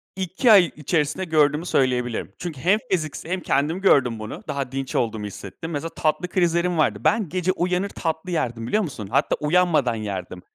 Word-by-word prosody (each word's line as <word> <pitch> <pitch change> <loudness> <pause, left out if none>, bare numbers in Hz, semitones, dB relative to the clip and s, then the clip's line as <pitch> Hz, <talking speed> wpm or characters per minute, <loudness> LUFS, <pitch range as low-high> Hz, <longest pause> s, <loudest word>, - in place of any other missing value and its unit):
2 190 +6 +2
ay 190 -5 +7
içerisinde 150 +3 -1
gördüğümü 155 -1 +2
söyleyebilirim. 125 - 0
Çünkü 160 -7 -6
hem 195 +5 +3
fiziksel 160 -2 -2
hem 185 - 0
kendim 160 +3 0
gördüm 125 - +3
bunu. 110 0 -7
Daha 135 -2 -3
dinç 135 -1 -4
olduğumu 110 -2 -1
hissettim. 105 - -8
Mesela 160 +2 -3
tatlı 155 +3 -1
krizlerim 175 -1 +1
vardı. 155 - +2
Ben 215 -7 +2
gece 185 +1 0
uyanır 180 +2 -1
tatlı 165 +1 -3
yerdim, 120 -8 -2
biliyor 210 - +1
musun? 130 - -6
Hatta - - +2
uyanmadan 150 -6 +2
yerdim. 95 -4 -5
155 Hz, 170 wpm, -23 LUFS, 125-180 Hz, -, ay